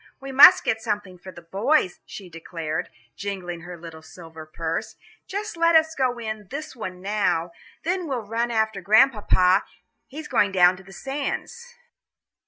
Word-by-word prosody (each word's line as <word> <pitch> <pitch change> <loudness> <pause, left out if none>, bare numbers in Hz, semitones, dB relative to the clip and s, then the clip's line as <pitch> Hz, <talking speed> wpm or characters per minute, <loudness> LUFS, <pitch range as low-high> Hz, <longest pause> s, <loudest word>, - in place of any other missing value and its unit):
"We 270 -1 -8
must 290 +8 +9
get 225 - -1
something 205 -5 -4
for 185 +1 -10
the 175 -1 -13
boys," 195 - +1
she 195 - -9
declared, 165 0 -5 0.3
jingling 185 -4 -5
her 175 +1 -9
little 165 -1 -11
silver 160 -1 -12
purse; 165 +1 -4 0.3
"just 415 +1 -5
let 335 0 +3
us 320 0 +4
go 255 -4 0
in 215 -3 -6
this 305 0 -7
one 185 -6 -7
now, 195 -5 0 0.3
then 360 +1 -1
we'll 250 -6 -3
run 230 +3 -1
after 220 -3 0
Grandpapa; 205 -3 +4 0.4
he's 300 +3 -8
going 205 -6 +2
down 180 0 +5
on 190 - -16
the 195 - -14
sands." 285 - -5
205 Hz, 160 wpm, -24 LUFS, 180-270 Hz, 0.4 s, must